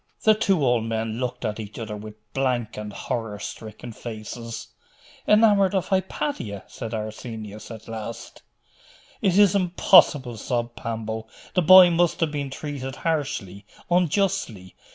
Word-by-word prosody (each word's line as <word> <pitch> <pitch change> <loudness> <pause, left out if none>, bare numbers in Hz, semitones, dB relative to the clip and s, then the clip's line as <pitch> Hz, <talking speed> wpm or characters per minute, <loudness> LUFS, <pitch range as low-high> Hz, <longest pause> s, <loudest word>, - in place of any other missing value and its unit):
The 215 - +7
two 195 -8 +1
old 120 -3 +2
men 115 0 -2
looked 125 -1 -3
at 110 0 -2
each 105 -1 -8
other 110 -2 -5
with 105 0 -9 0.2
blank 125 -4 -1
and 105 -1 -6
horror 110 0 -4
stricken 110 +3 -8
faces. 115 +1 -7 0.6
'Enamoured 205 -3 +5
of 190 - -1
Hypatia?' 190 - -2
said 115 -2 -6
Arsenius 110 -1 -7
at 110 -1 -10
last. 115 0 -7 0.8
'It 190 -1 +2
is 205 -3 +6
impossible!' 170 - +4
sobbed 120 +2 -2
Pambo. 110 -1 -4 0.3
'The 180 - +3
boy 180 +1 +9
must 170 0 +2
have 160 -2 +1
been 145 -2 -3
treated 135 -2 -5
harshly, 135 - -2 0.3
unjustly? 175 - 0
120 Hz, 135 wpm, -24 LUFS, 110-170 Hz, 0.8 s, boy